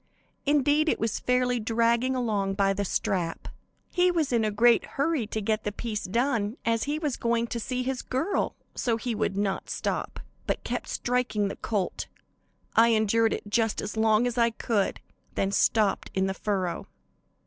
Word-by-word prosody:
Indeed, 295 +2 +3
it - - 0
was 225 -1 -1
fairly 250 -1 +1
dragging 235 +3 +1
along 205 -6 0
by 195 0 +2
the 200 +1 -2
strap. 175 -3 -2 0.4
He 360 0 +3
was 320 -7 0
in 230 -2 +3
a 215 - +2
great 230 +3 +4
hurry 280 -5 +1
to 220 - -3
get 215 +1 0
the 210 - -2
piece 210 0 -4
done, 230 +1 0
as 230 0 +1
he 295 +2 -1
was 300 -5 -2
going 235 0 +1
to 235 0 -4
see 255 +2 -2
his 260 0 -2
girl; 265 +10 -1 0.2
so 230 -2 0
would 215 -4 -1
not 200 -1 -1
stop, - - -3 0.3
but - - -1
kept - - -3
striking 240 -5 0
the - - -5
colt. 205 -5 -2 0.7
I 230 +1 +7
endured 225 0 +3
it - - -3
just 225 +1 +1
as 210 - -4
long 220 +1 +3
as 245 0 -1
I 235 0 +5
could, 225 -3 -1 0.3
then 195 - 0
stopped 210 0 +2
in 190 0 +2
the 190 - -1
furrow. 190 -3 -2
230 Hz, 175 wpm, -27 LUFS, 205-250 Hz, 0.7 s, I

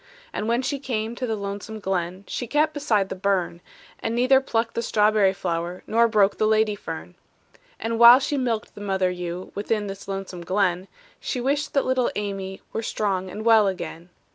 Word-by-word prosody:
And 210 - -3
when 235 +2 +1
she 280 +1 -2
came 230 -4 -3
to 250 +1 -4
the 220 - -1
lonesome 200 +2 -6
glen, 185 -1 -2
She 245 - -4
kept 305 +4 +2
beside 220 -10 +1
the - - -4
burn, 185 -3 -1 0.4
And 225 - -2
neither 255 +2 +4
plucked 230 -3 -1
the - - -1
strawberry 210 -3 +3
flower 175 -2 -3
Nor 230 +2 +3
broke 210 -3 +2
the 215 - +3
lady 215 -1 +3
fern. 170 -3 -7 0.7
And 230 0 -2
while 235 +1 +10
she 280 +2 -1
milked 240 -5 -2
the 205 - -11
mother 190 -2 0
ewe 180 0 -5
Within 210 +1 -1
this 195 0 -7
lonesome 195 -2 -5
glen, 185 0 0 0.3
She 255 - -3
wished 285 +4 -1
that 275 - +3
little 255 -1 +1
Amy 195 -2 -4
Were 225 - -1
strong 195 -4 -1
and 210 +4 -7
well 220 -3 +6
again. 175 -2 -5
210 Hz, 190 wpm, -24 LUFS, 190-235 Hz, 0.7 s, while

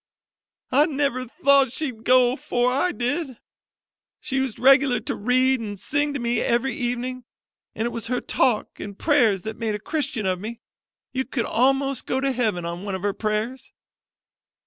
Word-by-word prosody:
"I 290 +4 +5
never 275 -4 -1
thought 280 -2 +3
she'd 255 -6 -4
go 250 -1 +5
afore 250 -2 0
I 280 +8 +1
did. 270 -1 -2 0.8
She 265 - -3
used 265 -4 -1
regular 265 -1 +5
to - - -3
read 255 +3 +2
an' 205 -2 -5
sing 290 +8 -1
to - - -2
me 235 0 0
every 240 +2 +1
evening, 250 +1 -3 0.5
an' 220 - -2
it 240 - -1
was 230 -1 -4
her 250 +1 0
talk 245 -5 0
an' 200 -1 -7
prayers 225 - +2
that 220 0 -6
made 220 -2 -1
a - - -5
Christian 275 -4 -2
of 185 -1 0
me: 225 +4 -7 0.5
you 260 0 -1
could 260 -3 -3
a'most 270 +2 +1
go 260 - 0
to 270 0 +1
heaven 220 -9 -1
on 170 +1 -5
one 200 -2 -3
of 190 - -6
her 205 -1 0
prayers." 215 +5 -3
250 Hz, 175 wpm, -24 LUFS, 220-270 Hz, 0.8 s, I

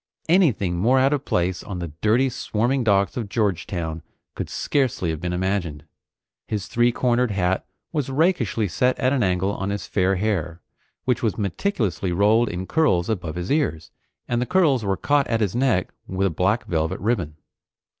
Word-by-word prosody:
Anything 130 - +3
more 120 +9 +3
out 135 +2 +4
of 145 -1 -2
place 90 +1 0
on 95 - -6
the 85 -2 -4
dirty 120 +5 +3
swarming 125 +1 -1
docks 100 -2 +2
of 115 -5 -3
Georgetown 90 -6 -2 0.3
could - - -5
scarcely 125 - 0
have 80 0 -5
been 90 0 -2
imagined. 90 -5 -2 0.6
His 105 -3 -3
three 120 +1 +2
cornered 125 0 +1
hat 95 -2 0 0.3
was 145 -5 -1
rakishly 135 - +1
set 125 +9 +1
at 130 0 +1
an 135 - +1
angle 95 -1 +1
on 95 0 -3
his 100 0 -3
fair 95 0 +1
hair, 90 -5 -1 0.5
which 125 -2 +1
was 110 -3 0
meticulously 100 - -1
rolled 105 +5 +3
in 95 -1 -4
curls 115 - +2
above 85 -6 -3
his 90 +5 -4
ears, 130 - 0 0.4
and 120 0 0
the 125 - -1
curls 160 -10 +3
were 100 -2 0
caught 145 -1 +2
at 115 -1 0
his 105 -3 0
neck 125 -8 +1
with 95 +1 -1
a 95 - +1
black 95 +8 +1
velvet 80 -1 -1
ribbon. 95 -7 -1
105 Hz, 175 wpm, -23 LUFS, 90-125 Hz, 0.6 s, out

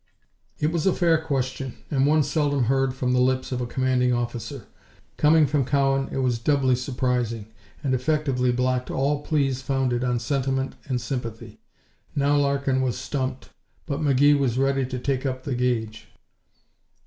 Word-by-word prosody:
It 150 +1 0
was 170 +1 0
a 190 - +4
fair 165 -2 +3
question, 135 -3 -3 0.2
and 135 -1 +2
one 155 0 +4
seldom 145 -3 +1
heard 135 +1 +1
from 125 -1 0
the 125 - +3
lips 130 +1 +1
of 125 -1 -2
a 120 - -2
commanding 130 0 +1
officer. 120 +1 -3 0.5
Coming 155 +1 +5
from 145 -1 +1
Cowan, 135 0 +1
it 135 - -1
was 125 -2 +1
doubly 130 0 +2
surprising, 125 -4 -2 0.3
and 135 -3 0
effectively 130 -1 +1
blocked 125 0 0
all 140 +2 0
pleas 140 -4 0
founded 130 -2 0
on 125 -1 +1
sentiment 135 +2 -1
and 130 -2 -1
sympathy. 115 -2 -6 0.6
Now 145 0 +2
Larkin 140 -2 +1
was 125 -2 -1
stumped, 130 0 -4 0.3
but 140 -1 -3
McGee 145 0 +4
was 125 -3 0
ready 135 -1 +1
to 130 0 -4
take 130 +1 -1
up 130 -2 -3
the 140 - -3
gage. 115 -3 -2
130 Hz, 160 wpm, -24 LUFS, 125-140 Hz, 0.6 s, Coming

